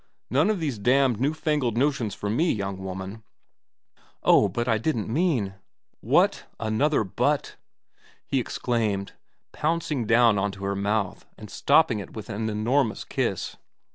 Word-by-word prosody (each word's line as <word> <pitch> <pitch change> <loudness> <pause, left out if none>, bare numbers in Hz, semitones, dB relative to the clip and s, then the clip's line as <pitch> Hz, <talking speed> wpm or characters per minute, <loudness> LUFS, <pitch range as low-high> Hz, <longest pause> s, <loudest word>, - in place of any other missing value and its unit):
None - - +3
of 215 -3 0
these 140 -9 -2
damned 125 +1 +3
new 140 +3 +2
fangled 150 -7 -1
notions 125 -6 0
for 105 - -5
me, 155 +12 +2
young 100 -2 -3
woman.' 95 +3 -6 0.7
4 - - -31 0.2
Oh, - - +5
but 120 0 -2
I 110 -2 +2
didn't 115 -3 -1
mean 145 - +1
4 - - -19 0.5
What? - - +2
Another 110 +5 +1
but? 95 - -1 0.4
' - - -31
he 135 - 0
exclaimed, 110 -5 -1 0.4
pouncing 150 -6 -1
down 115 -2 +5
on 100 +1 0
to 100 0 -10
her 100 0 -1
mouth 100 -1 -1
and 105 - -11
stopping 140 -6 +3
it 100 - -9
with 110 0 -7
an 110 +2 -2
enormous 115 +3 0
kiss. - - -2
115 Hz, 160 wpm, -25 LUFS, 100-140 Hz, 0.7 s, Oh